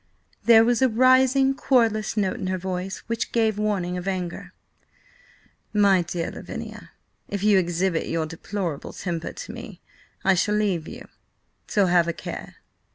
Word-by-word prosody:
There 225 Hz, -1 st, +7 dB
was 240 Hz, +1 st, +2 dB
a 260 Hz, -, +5 dB
rising, 260 Hz, +3 st, +4 dB
querulous 230 Hz, -5 st, +1 dB
note 210 Hz, +4 st, 0 dB
in 190 Hz, -, -3 dB
her 185 Hz, 0 st, -1 dB
voice 185 Hz, +1 st, -4 dB
which 230 Hz, -1 st, -3 dB
gave 220 Hz, -3 st, +1 dB
warning 190 Hz, -4 st, -1 dB
of 180 Hz, +1 st, -6 dB
anger. 180 Hz, -3 st, -4 dB, 1.2 s
"My 200 Hz, -3 st, +5 dB
dear 170 Hz, -1 st, -3 dB
Lavinia, -, -, -8 dB, 0.4 s
if 200 Hz, -1 st, -3 dB
you 205 Hz, -2 st, +5 dB
exhibit 175 Hz, -1 st, 0 dB
your 165 Hz, -1 st, -1 dB
deplorable 165 Hz, 0 st, -5 dB
temper 170 Hz, -3 st, -4 dB
to -, -, -8 dB
me, 230 Hz, -6 st, -9 dB, 0.5 s
I 195 Hz, -, +5 dB
shall 205 Hz, +3 st, +1 dB
leave 195 Hz, -7 st, 0 dB
you, -, -, -9 dB, 0.6 s
so 200 Hz, -2 st, +2 dB
have 175 Hz, -1 st, +3 dB
a 170 Hz, -, -1 dB
care. -, -, -8 dB
195 Hz, 155 wpm, -24 LUFS, 180-225 Hz, 1.2 s, There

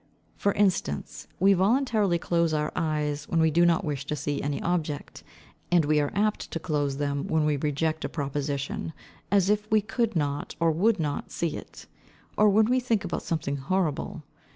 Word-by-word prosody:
For 200 Hz, -, +1 dB
instance, 185 Hz, -, -1 dB
we 195 Hz, +2 st, +5 dB
voluntarily 210 Hz, -1 st, +2 dB
close 170 Hz, -1 st, +1 dB
our 150 Hz, 0 st, -1 dB
eyes 150 Hz, -2 st, -1 dB
when 165 Hz, -, +1 dB
we 160 Hz, 0 st, +4 dB
do 170 Hz, +2 st, +4 dB
not 170 Hz, -1 st, +2 dB
wish 145 Hz, -3 st, -2 dB
to 150 Hz, -, -1 dB
see 145 Hz, -1 st, -2 dB
any 145 Hz, 0 st, -2 dB
object, 165 Hz, -4 st, -2 dB, 0.5 s
and 175 Hz, -3 st, +4 dB
we 150 Hz, 0 st, +3 dB
are 145 Hz, -1 st, 0 dB
apt 210 Hz, +1 st, 0 dB
to 165 Hz, -, -4 dB
close 145 Hz, -4 st, -1 dB
them, 140 Hz, -1 st, -2 dB
when 160 Hz, -1 st, +1 dB
we 150 Hz, -1 st, +2 dB
reject 155 Hz, +2 st, -1 dB
a -, -, -2 dB
proposition, 140 Hz, +1 st, -3 dB, 0.4 s
as 200 Hz, -2 st, +3 dB
if 210 Hz, +1 st, +1 dB
we 215 Hz, -, +5 dB
could 225 Hz, +1 st, -1 dB
not 145 Hz, -2 st, -2 dB
or 165 Hz, 0 st, +3 dB
would 200 Hz, +6 st, +2 dB
not 145 Hz, -3 st, -2 dB
see 165 Hz, -3 st, -2 dB
it; -, -, -10 dB, 0.5 s
or 210 Hz, 0 st, +5 dB
when 215 Hz, +2 st, +5 dB
we 250 Hz, +3 st, +2 dB
think 230 Hz, -5 st, 0 dB
about 175 Hz, -, -3 dB
something 145 Hz, -4 st, -2 dB
horrible. 155 Hz, +2 st, -2 dB
160 Hz, 185 wpm, -27 LUFS, 145-195 Hz, 0.5 s, we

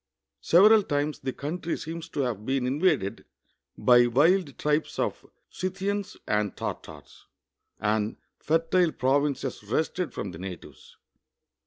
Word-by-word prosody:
Several 210 Hz, +5 st, +6 dB
times 145 Hz, -4 st, -2 dB
the 130 Hz, -, -3 dB
country 165 Hz, +5 st, -4 dB
seems 165 Hz, +1 st, -7 dB
to 145 Hz, -, -2 dB
have 120 Hz, -6 st, -2 dB
been 130 Hz, +1 st, 0 dB
invaded 140 Hz, -, 0 dB, 0.5 s
by 120 Hz, -1 st, +5 dB
wild 145 Hz, +3 st, +2 dB
tribes 150 Hz, +1 st, 0 dB
of -, -, -2 dB, 0.3 s
Scj'thians 195 Hz, +2 st, -3 dB
and 105 Hz, -1 st, 0 dB
Tartars, -, -, -8 dB, 0.5 s
and 105 Hz, +1 st, 0 dB, 0.2 s
fertile 165 Hz, +2 st, +2 dB
pro\inces 135 Hz, -5 st, -1 dB
wrested 160 Hz, +5 st, -1 dB
from 100 Hz, -, -5 dB
the 85 Hz, -, -10 dB
natives. 90 Hz, -3 st, -10 dB
145 Hz, 120 wpm, -27 LUFS, 120-170 Hz, 0.5 s, Several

